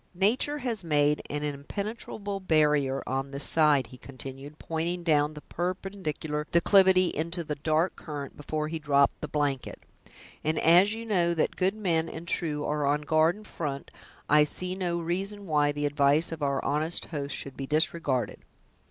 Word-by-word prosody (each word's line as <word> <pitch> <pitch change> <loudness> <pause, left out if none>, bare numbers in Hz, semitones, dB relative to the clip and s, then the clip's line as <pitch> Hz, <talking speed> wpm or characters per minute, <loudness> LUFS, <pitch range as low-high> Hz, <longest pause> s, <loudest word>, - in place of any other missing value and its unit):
"Nature 235 +10 +2
has 235 -8 -2
made 150 -2 +2
an 150 0 -3
impenetrable 200 +7 -4
barrier 150 -6 +2
on 135 +1 -2
this 140 +1 -4
side," 150 -5 +4
he 125 +2 -14
continued, 135 +2 -8
pointing 170 +3 -3
down 150 -2 +2
the 150 - -10
perpendicular 175 -4 -4
declivity 185 +1 +5
into 170 +3 -2
the 150 - -3
dark 155 +4 0
current 145 -3 -7
before 150 +1 -3
he 160 +1 -4
dropped 140 -2 +2
the 150 - -3
blanket; 145 -4 -2 0.6
"and 155 +1 0
as 180 +6 +5
you 230 +1 -7
know 175 -6 +1
that 160 - 0
good 190 +2 +1
men 170 -6 0
and 165 +2 -8
true 150 -4 -1
are 150 -1 0
on 145 +1 +1
guard 155 +3 +3
in 215 - -13
front 145 -8 -5 0.4
I 150 0 +6
see 180 +4 -4
no 180 -2 -2
reason 195 +5 -3
why 150 -3 +2
the 145 0 -2
advice 145 +3 +3
of 165 -2 -6
our 140 -1 0
honest 155 +4 0
host 145 -3 -4
should 135 - -6
be 135 - -5
disregarded. 150 -4 0
155 Hz, 170 wpm, -28 LUFS, 145-180 Hz, 0.6 s, I